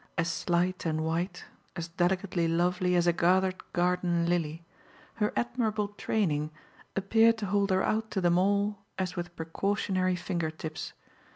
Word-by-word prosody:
As 165 0 +1
slight 180 +2 0
and 155 -1 0
white, 170 +4 -2 0.3
as 170 -2 -4
delicately 180 0 0
lovely, 180 +2 +1
as 175 -1 +3
a 175 - +4
gathered 185 +2 +2
garden 175 -1 +1
lily, 165 -1 -1 0.5
her 210 -2 +1
admirable 220 -4 0
training 165 -8 0 0.5
appeared 225 +4 +4
to 215 - -3
hold 200 +1 +1
her 190 0 +2
out 220 0 0
to 200 - -1
them 175 -1 +3
all 200 +1 +1 0.2
as 185 -1 -2
with 175 -1 -5
precautionary 185 +2 0
finger 175 -2 -2
tips. 155 0 -6
180 Hz, 150 wpm, -29 LUFS, 170-200 Hz, 0.5 s, a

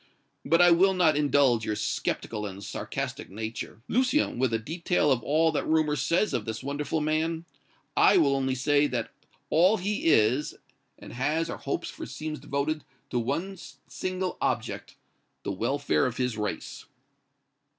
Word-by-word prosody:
But 165 +4 +4
I 175 - +7
will 190 +3 +5
not 165 -4 +4
indulge 140 -5 +3
your 110 - -1
skeptical 105 0 -2
and 100 0 -8
sarcastic - - -5
nature, 110 +2 -6
Lucien, 255 - +1
with 130 -2 +2
a 115 - +2
detail 160 +4 0
of 125 -3 +2
all 160 +6 +2
that 155 - -2
rumor 155 -1 +2
says 170 +6 +1
of 120 -5 -1
this 110 +2 -5
wonderful 145 +3 -2
man. 160 +2 -1 0.5
I - - +6
will 140 -1 +4
only 135 -1 0
say 145 +3 +3
that 120 -5 -3 0.4
all 185 +7 +5
he 205 +3 -2
is, 130 -1 +3 0.4
and - - -11
has 150 +7 0
or - - -5
hopes - - -3
for - - -8
seems 155 -1 -5
devoted 145 +2 -2 0.3
to 120 - +1
one 165 +11 -3 0.3
single 185 0 -3
object - - -2 0.5
the - - -2
welfare 130 +9 +1
of 125 - -5
his 125 -2 0
race." 105 -1 -4
145 Hz, 160 wpm, -27 LUFS, 120-165 Hz, 0.5 s, I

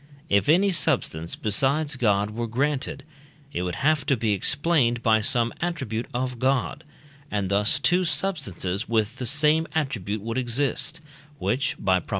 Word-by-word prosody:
if 100 +8 +2
any 190 +5 +4
substance 85 - 0
besides 140 +7 +1
God 105 -4 +1
were 115 +2 -3
granted, 135 +3 -1 0.5
it - - -2
would 90 -1 -3
have 155 -1 +3
to 135 - +3
be 110 -2 +1
explained 130 - +1
by 110 -1 +4
some 115 +2 +1
attribute 160 -10 -3
of 125 0 -3
God, 135 +3 0 0.5
and 100 -2 -2
thus 105 +5 +3
two 175 +7 +2
substances 120 - -1
with 110 -1 0
the 125 - -2
same 150 +4 +2
attribute 110 - -2
would 115 +3 -2
exist, 140 +6 -1 0.4
which 140 0 -1
(by 95 -2 +2
Prop. - - -16
125 Hz, 155 wpm, -25 LUFS, 105-150 Hz, 0.5 s, any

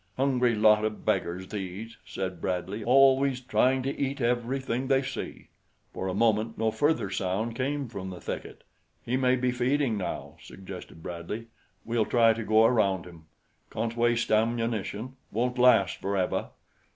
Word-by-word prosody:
"Hungry 125 -3 +2
lot 105 0 +5
o' 110 - +2
beggars, 95 -3 -2
these," 105 +3 -6
said 95 -2 -5
Bradley; 95 +3 -2
"always 135 +1 +4
trying 130 +1 +2
to 135 +2 -2
eat 140 +1 -2
everything 125 +1 -1
they 135 0 +3
see." - - -6 0.4
For 95 - -4
a 95 - -2
moment 110 +1 +1
no 110 0 +1
further 145 -3 +1
sound 100 +5 -2
came 140 +2 -2
from 100 -4 -6
the 90 -1 -8
thicket. - - -6 0.4
"He 125 - 0
may 130 -1 +3
be 125 0 0
feeding 125 -1 +1
now," 95 - -5
suggested 95 -4 -10
Bradley. 90 +7 -6 0.4
"We'll 115 -2 0
try 115 -2 +5
to 110 0 -5
go 110 +1 +4
around 100 -6 +2
him. 85 -3 -13 0.4
Can't 115 0 -3
waste 120 0 +1
ammunition. 115 +1 0
Won't 125 +3 -1
last 125 0 +5
forever. 95 -2 -1
115 Hz, 150 wpm, -28 LUFS, 100-125 Hz, 0.4 s, lot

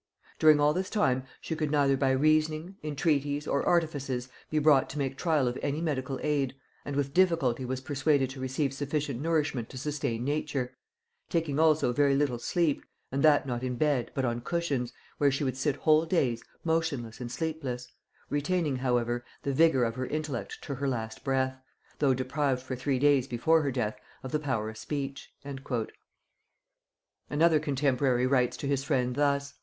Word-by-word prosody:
During 155 -1 +6
all 145 +1 +4
this 185 +2 -2
time 130 - +1 0.2
she 160 - -3
could 155 -2 -1
neither 140 -2 +3
by 135 0 +1
reasoning, 155 +5 +2
entreaties, 145 -1 0
or 140 - +1
artifices 140 -7 0 0.2
be 155 - -1
brought 150 -3 +4
to 150 - -6
make 135 -2 -1
trial 155 -4 +1
of 120 +1 -2
any 145 +2 -1
medical 135 -5 -2
aid, 140 -3 0 0.3
and 145 - -5
with 140 -1 -1
difficulty 165 -9 +2
was 130 +1 -3
persuaded 140 -1 +1
to 135 - -9
receive 130 +2 -1
sufficient 145 -2 -2
nourishment 150 -7 0
to 130 - -9
sustain 125 -4 -2
nature; 140 -3 -2 0.5
taking 160 -4 0
also 155 -5 +4
very 140 +1 +3
little 135 -4 +1
sleep, 165 +1 0 0.3
and 135 +1 -1
that 150 -2 +5
not 120 -2 -3
in 130 -1 -2
bed, 140 -3 +1
but 135 - 0
on 120 0 -1
cushions, 140 -5 -1 0.3
where 145 - +5
she 135 +2 -1
would 130 -2 -1
sit 135 +1 0
whole 155 +2 +3
days 125 -10 +1 0.2
motionless 160 -9 -1
and 120 -1 -5
sleepless; 135 -4 -3 0.4
retaining 145 -1 0
however 120 -1 0 0.2
the 140 - -1
vigor 145 -3 +4
of 115 -1 0
her 130 +1 -3
intellect 150 -4 -3
to 140 - -4
her 140 +1 -2
last 110 -4 -3
breath, 130 -1 0 0.4
though 135 -3 +3
deprived 130 0 -1
for 130 0 -4
three 130 +1 0
days 140 -1 +3
before 160 +6 +3
her 140 -2 0
death 110 -4 -2 0.2
of 130 - -6
the 150 - +1
power 130 -8 -1
of 110 0 -7
speech." 135 +3 -5 2.0
Another 155 +1 +4
contemporary 135 -3 +1
writes 130 -2 +2
to - - -5
his 140 -1 0
friend 125 -4 0
thus.... 140 0 +1
140 Hz, 175 wpm, -29 LUFS, 130-150 Hz, 2.0 s, During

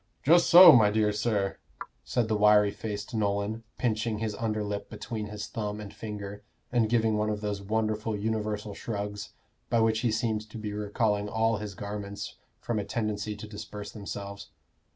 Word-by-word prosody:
"Just 170 +4 +5
so, 175 0 +11
my 110 -7 +6
dear 105 0 +2
sir," 105 -2 -1 0.4
said 120 -3 0
the 110 - +1
wiry 105 -1 +5
faced 105 +3 -6
Nolan, 105 +1 -1 0.2
pinching 110 -2 0
his 110 0 -2
under 110 -1 -2
lip 100 -1 -4
between 105 0 -5
his 105 0 -6
thumb 105 -1 -4
and 105 -2 -8
finger, 105 -1 -7 0.3
and 120 -3 +2
giving 110 -2 +2
one 105 0 +1
of 105 -1 -2
those 105 -1 -3
wonderful 110 +1 -1
universal 105 -1 -2
shrugs, 105 -1 -5 0.4
by 115 - +3
which 110 0 +3
he 115 -1 +1
seemed 110 -1 -1
to 110 - -9
be 105 -1 -4
recalling 105 0 0
all 110 +1 +1
his 105 -1 -6
garments 100 0 -6 0.2
from 115 -3 -2
a - - -1
tendency 105 -1 -2
to 105 +1 -9
disperse 105 -1 -8
themselves. 100 -1 -7
105 Hz, 175 wpm, -28 LUFS, 105-110 Hz, 0.4 s, so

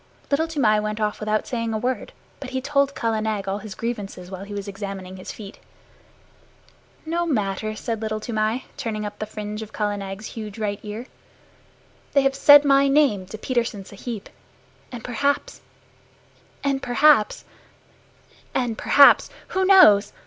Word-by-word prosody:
Little 315 +3 +2
Toomai 245 -10 +2
went 215 0 -3
off 210 -1 -1
without 215 0 -1
saying 230 -2 -2
a - - +1
word, 250 +3 -3 0.3
but 275 - -7
he 260 0 -2
told 280 +1 +1
Kala 225 -1 -1
Nag 215 -3 -2
all 195 +1 -2
his 210 -2 -9
grievances 200 -6 -5
while 190 +1 -7
he 205 - -9
was 200 0 -5
examining 195 -2 -7
his 185 - -7
feet. 205 -2 -11 1.5
"No 340 +2 -1
matter," 215 - -1
said 225 0 -4
Little 215 -1 -2
Toomai, 220 +2 -1
turning 215 -2 -3
up 205 0 -7
the 215 - -4
fringe 210 0 -6
of 220 - -8
Kala 205 -1 -1
Nag's 195 +2 -7
huge 215 -2 -7
right 205 -2 -2
ear. 215 +3 -7 1.1
"They 280 - +4
have 270 0 +2
said 290 +1 +7
my 275 0 +5
name 275 -10 +2
to 215 - -8
Petersen 230 -4 -2
Sahib, 210 +1 -7 0.6
and 240 -3 -8
perhaps 280 +4 -1 1.0
and 275 -1 0
perhaps 250 -2 +3 1.1
and 240 -4 -1
perhaps 285 -1 +6 0.2
who 380 0 0
knows? 215 - +6
220 Hz, 155 wpm, -23 LUFS, 205-265 Hz, 1.5 s, said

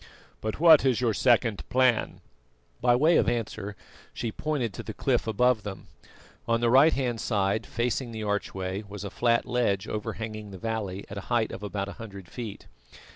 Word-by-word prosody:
But 110 +4 -3
what 160 -2 +8
is 130 -4 +2
your 120 -3 +1
second 115 -3 +2
plan?" 130 -2 +2 0.6
By 120 0 +4
way 155 +7 +4
of - - +3
answer, 110 -3 -3 0.4
she 115 - -3
pointed 135 -6 -2
to - - -6
the - - -7
cliff - - 0
above 120 +1 +3
them. 100 -4 -8 0.6
On 115 0 +2
the 120 0 +2
right 140 +5 +7
hand 125 -4 -1
side, 105 0 0
facing 120 +1 -1
the 110 -1 -5
archway, 95 -2 -2
was 100 -1 -7
a 100 - -5
flat 120 -1 +2
ledge 100 -6 0
overhanging 110 0 -5
the 95 - -9
valley, 100 -2 -3
at 100 - -6
a - - -12
height 115 -2 +1
of - - -7
about 100 -1 -3
a - - -6
hundred 100 -5 -9
feet. 110 +1 -7
110 Hz, 180 wpm, -27 LUFS, 100-120 Hz, 0.6 s, what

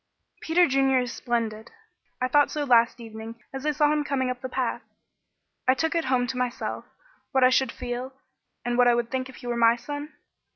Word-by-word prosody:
"Peter 345 +2 +3
Junior 270 -1 +3
is 245 -1 -4
splendid. 225 -2 -2 0.5
I 255 - +1
thought 290 +2 +4
so 300 - -2
last 235 -3 +4
evening 225 0 -9
as 270 +2 -4
I - - +4
saw 295 0 +3
him 300 -1 +1
coming 260 -3 -1
up 250 0 -7
the 260 - -5
path. - - -2 0.9
I 260 - +5
took 320 +5 0
it 335 -1 0
home 255 -1 +2
to 250 +1 -4
myself 250 -1 -3 0.5
what 265 -1 +4
I 255 - +6
should 260 -2 +2
feel, 245 +1 -5 0.5
and 240 0 0
what 245 - +6
I 240 - +5
would 235 -1 -2
think 260 0 -2
if 260 - -12
he - - -12
were 240 0 -1
my 230 0 +5
son. 290 +5 -7
255 Hz, 210 wpm, -26 LUFS, 240-275 Hz, 0.9 s, I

